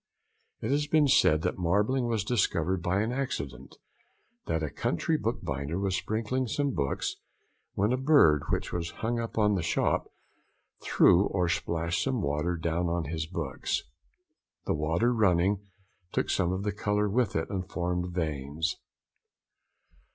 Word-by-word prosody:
It 110 - -2
has 145 +1 +1
been 150 -1 +4
said 80 - +4
that - - -1
marbling 105 +9 +1
was 115 -4 0
discovered 95 -5 0
by 90 +3 +1
an 115 - -2
accident; 70 - -4 0.7
that 80 -1 0
a 75 - -2
country - - 0
bookbinder 70 +4 -2
was 95 -1 0
sprinkling 115 +6 -1
some 140 +4 0
books, 70 -5 -2 0.6
when 105 +5 +2
a - - +1
bird, 130 - +5
which - - -1
was 85 -1 -2 0.2
hung 120 +1 0
up 115 -1 -5
in 105 -1 +4
the 95 - 0
shop, 85 - 0 0.7
threw 90 +3 +5
or 90 -2 0
splashed 85 0 -1
some 130 -2 0
water 75 +4 0
down 85 +2 -1
on 85 0 -1
his 80 -1 -3
books; 80 -6 -3 0.8
the - - +1
water 80 +11 +1
running, 100 -1 +2 0.4
took - - 0
some 90 -1 +1
of 95 +1 -2
the 105 - 0
colour 105 +1 0
with 115 +1 0
it 80 - -1
and 95 -1 -3
formed 90 0 -2
veins. 80 -1 -2
90 Hz, 150 wpm, -29 LUFS, 80-110 Hz, 0.8 s, bird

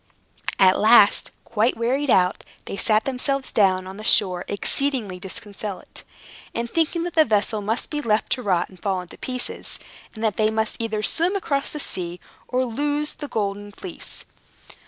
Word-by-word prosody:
At 190 -1 +5
last, 215 -1 +6
quite 230 +2 +1
wearied 265 +5 0
out, 180 -4 +3 0.2
they - - -5
sat 215 +1 +2
themselves 270 +1 -1
down 185 -3 +3
on 190 +1 -8
the 215 - -8
shore 185 -5 +4
exceedingly 215 -2 -1
disconsolate, 200 +1 -7 0.5
and 235 0 -1
thinking 330 +4 0
that 350 -1 -4
the 315 - +6
vessel 215 -2 +1
must 220 +4 -2
be 295 -1 -2
left 220 -4 0
to 255 - +1
rot 185 -6 +1
and 185 - -17
fall 195 -2 0
in 180 - -12
pieces, 255 -1 -4 0.4
and 220 - -6
that 215 -3 +1
they 215 0 +3
must 220 0 -1
either 220 -2 -2
swim 345 - +3
across 285 -8 -1
the 300 - -5
sea 175 -8 -4 0.3
or 255 +1 +1
lose 290 +5 -1
the 295 - -7
Golden 205 -3 -3
Fleece. 185 -3 -8
220 Hz, 170 wpm, -23 LUFS, 200-265 Hz, 0.5 s, last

